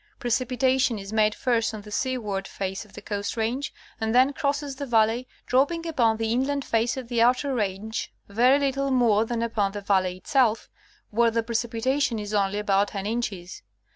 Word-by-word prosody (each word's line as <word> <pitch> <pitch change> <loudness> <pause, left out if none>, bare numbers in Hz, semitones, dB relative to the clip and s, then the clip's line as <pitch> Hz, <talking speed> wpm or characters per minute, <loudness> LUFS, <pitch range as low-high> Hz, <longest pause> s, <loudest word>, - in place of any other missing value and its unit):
Precipitation 255 0 +1
is 195 +1 -8
made 215 -1 +3
first 230 -3 0
on 210 - -7
the 210 +1 -12
seaward 210 -6 -2
face 195 +2 -4
of 210 - -21
the - - -10
Coast 205 +2 -3
Range, 235 +5 -1 0.3
and 220 +1 0
then 260 +3 +5
crosses 285 -1 -2
the 280 0 -5
valley, 230 +1 +2 0.2
dropping 285 +6 +1
upon 235 -9 +2
the 225 0 -1
inland 275 +3 0
face 230 +2 0
of 255 -2 -5
the 235 -1 0
outer 255 +4 +3
range 215 -1 -3 0.2
very 245 +7 +4
little 275 -1 0
more 230 -5 +3
than 230 0 -2
upon 210 -4 0
the 205 - -5
valley 190 -2 +1
itself, 230 +1 +1 0.4
where 230 +2 +3
the 230 0 0
precipitation 235 +3 0
is 210 0 -5
only 200 -1 +1
about 200 -1 +2
10 195 -1 -5
inches. 205 -5 -4
230 Hz, 180 wpm, -25 LUFS, 210-255 Hz, 0.4 s, then